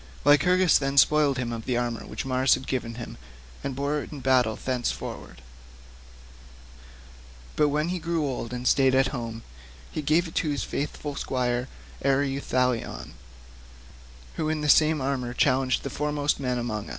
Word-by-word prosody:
Lycurgus 180 Hz, +4 st, +5 dB
then 135 Hz, 0 st, -2 dB
spoiled 145 Hz, -1 st, +5 dB
him 120 Hz, -2 st, -2 dB
of 115 Hz, -1 st, -6 dB
the 125 Hz, -2 st, 0 dB
armour 120 Hz, -1 st, -3 dB
which -, -, -5 dB
Mars 130 Hz, 0 st, +3 dB
had 130 Hz, -, -8 dB
given 120 Hz, -4 st, -3 dB
him, 120 Hz, 0 st, -8 dB, 0.5 s
and 135 Hz, -2 st, -3 dB
bore 145 Hz, +2 st, -1 dB
it -, -, -9 dB
in 150 Hz, -, -7 dB
battle 125 Hz, -4 st, +2 dB
thenceforward; 120 Hz, -, -4 dB, 2.1 s
but 150 Hz, -, +3 dB
when 150 Hz, +3 st, 0 dB
he 180 Hz, 0 st, -2 dB
grew 165 Hz, -1 st, -1 dB
old 125 Hz, -4 st, -4 dB
and 125 Hz, 0 st, -3 dB
stayed 135 Hz, -1 st, +4 dB
at 135 Hz, 0 st, +3 dB
home, 115 Hz, -3 st, -5 dB, 0.5 s
he 155 Hz, -, -3 dB
gave 155 Hz, +4 st, +2 dB
it 160 Hz, -, -11 dB
to 155 Hz, -, 0 dB
his 145 Hz, -1 st, -1 dB
faithful 145 Hz, 0 st, -4 dB
squire 125 Hz, -2 st, -1 dB, 0.4 s
Ereuthalion, 130 Hz, -, 0 dB, 1.3 s
who 155 Hz, -, -1 dB
in 155 Hz, -1 st, -1 dB
this 150 Hz, -1 st, +6 dB
same 155 Hz, -1 st, +3 dB
armour 130 Hz, -2 st, -2 dB
challenged 130 Hz, -1 st, +2 dB
the 140 Hz, -, -4 dB
foremost 150 Hz, 0 st, -1 dB
men 125 Hz, -2 st, -1 dB
among 110 Hz, -4 st, -3 dB
us. -, -, -10 dB
135 Hz, 165 wpm, -26 LUFS, 125-150 Hz, 2.1 s, this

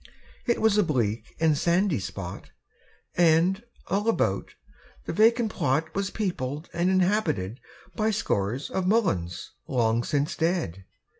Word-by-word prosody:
It 235 Hz, -, +2 dB
was 220 Hz, -1 st, +3 dB
a -, -, +5 dB
bleak 115 Hz, -, -1 dB
and 160 Hz, -2 st, +3 dB
sandy 170 Hz, -, +2 dB
spot, 95 Hz, -1 st, -7 dB, 0.6 s
And, 175 Hz, +3 st, +3 dB, 0.2 s
all 205 Hz, +4 st, 0 dB
about, 225 Hz, -, 0 dB, 0.5 s
the -, -, -3 dB
vacant 225 Hz, +1 st, +4 dB
plot 155 Hz, 0 st, 0 dB
Was 195 Hz, -1 st, -1 dB
peopled 155 Hz, -8 st, -3 dB
and 175 Hz, +2 st, +1 dB
inhabited 180 Hz, -, +1 dB, 0.4 s
By 215 Hz, -1 st, +1 dB
scores 120 Hz, -, -1 dB
of 185 Hz, -1 st, -1 dB
mulleins 100 Hz, -, 0 dB, 0.2 s
long 115 Hz, -2 st, +1 dB
since 145 Hz, +2 st, -1 dB
dead. 160 Hz, -, -1 dB
165 Hz, 130 wpm, -26 LUFS, 120-200 Hz, 0.6 s, a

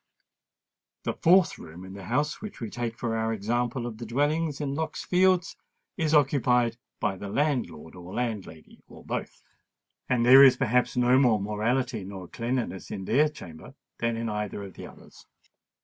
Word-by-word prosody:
The -, -, -1 dB
fourth 180 Hz, +1 st, +4 dB
room 85 Hz, +3 st, -10 dB
in 95 Hz, -, -10 dB
the 100 Hz, -1 st, -9 dB
house 150 Hz, -, -1 dB
which 210 Hz, 0 st, -8 dB
we 115 Hz, -4 st, -5 dB
take 120 Hz, -1 st, -4 dB
for 115 Hz, -2 st, -2 dB
our 110 Hz, 0 st, 0 dB
example 120 Hz, +3 st, -1 dB
of 115 Hz, -2 st, -6 dB
the 120 Hz, -, -6 dB
dwellings 145 Hz, +5 st, 0 dB
in 140 Hz, -2 st, -2 dB
Lock's 160 Hz, +1 st, -4 dB
Fields, 180 Hz, -1 st, +2 dB, 0.4 s
is 160 Hz, -3 st, +1 dB
occupied 125 Hz, -5 st, +3 dB, 0.2 s
by 95 Hz, -, -1 dB
the 100 Hz, +1 st, -7 dB
landlord 120 Hz, -, -1 dB
or 90 Hz, 0 st, -10 dB
landlady, 105 Hz, -10 st, -5 dB
or -, -, -15 dB
both; -, -, -5 dB, 0.7 s
and 120 Hz, -2 st, +2 dB
there 130 Hz, +3 st, +9 dB
is 130 Hz, -2 st, +7 dB
perhaps 125 Hz, -1 st, +1 dB
no 125 Hz, +1 st, +4 dB
more 120 Hz, -6 st, +4 dB
morality 110 Hz, +3 st, -1 dB
nor 95 Hz, -1 st, -8 dB
cleanliness 115 Hz, -5 st, -3 dB
in 95 Hz, -, -5 dB
their 150 Hz, +8 st, +3 dB
chamber 80 Hz, -, -12 dB, 0.2 s
than 115 Hz, 0 st, 0 dB
in 115 Hz, 0 st, -3 dB
either 105 Hz, -1 st, -3 dB
of 95 Hz, -, -9 dB
the -, -, -9 dB
others. -, -, -16 dB
120 Hz, 170 wpm, -27 LUFS, 105-140 Hz, 0.7 s, there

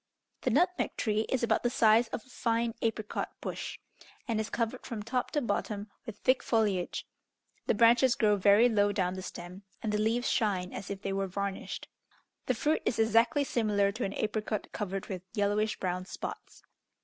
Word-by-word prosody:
The -, -, +1 dB
nutmeg 360 Hz, 0 st, +1 dB
tree 215 Hz, 0 st, 0 dB
is 260 Hz, -2 st, 0 dB
about 235 Hz, -, +2 dB
the 240 Hz, -, +1 dB
size 225 Hz, -1 st, +4 dB
of 225 Hz, -, -6 dB
a -, -, -22 dB
fine 230 Hz, -1 st, 0 dB
apricot 220 Hz, -2 st, -2 dB
bush, -, -, -5 dB, 0.5 s
and 225 Hz, -3 st, 0 dB
is 220 Hz, -, -2 dB
covered 235 Hz, +2 st, -2 dB
from 225 Hz, -5 st, -5 dB
top 250 Hz, +3 st, -1 dB
to 295 Hz, -, 0 dB
bottom 205 Hz, -1 st, -2 dB, 0.2 s
with 220 Hz, -2 st, -6 dB
thick 255 Hz, +3 st, +2 dB
foliage; 205 Hz, -6 st, 0 dB, 0.6 s
the -, -, +3 dB
branches 235 Hz, +3 st, +5 dB
grow 210 Hz, -2 st, +3 dB
very 205 Hz, +4 st, +6 dB
low 205 Hz, -3 st, +3 dB
down 185 Hz, -3 st, 0 dB
the 185 Hz, -, -5 dB
stem, 180 Hz, +1 st, -8 dB, 0.2 s
and 215 Hz, -, 0 dB
the 210 Hz, -, 0 dB
leaves 230 Hz, +3 st, +1 dB
shine 190 Hz, -6 st, 0 dB
as 190 Hz, -, -6 dB
if 200 Hz, 0 st, -5 dB
they 195 Hz, -, -1 dB
were 195 Hz, 0 st, -1 dB
varnished. 200 Hz, +1 st, -4 dB, 0.6 s
The 255 Hz, -, +2 dB
fruit 300 Hz, +7 st, +1 dB
is -, -, 0 dB
exactly 230 Hz, +6 st, +4 dB
similar 210 Hz, -6 st, +1 dB
to 225 Hz, +4 st, -4 dB
an 195 Hz, -, -2 dB
apricot 215 Hz, -1 st, -2 dB
covered 195 Hz, -2 st, -3 dB
with 185 Hz, -3 st, -5 dB
yellowish 210 Hz, +1 st, +1 dB
brown 185 Hz, 0 st, -2 dB
spots. -, -, -7 dB
215 Hz, 185 wpm, -30 LUFS, 200-235 Hz, 0.6 s, very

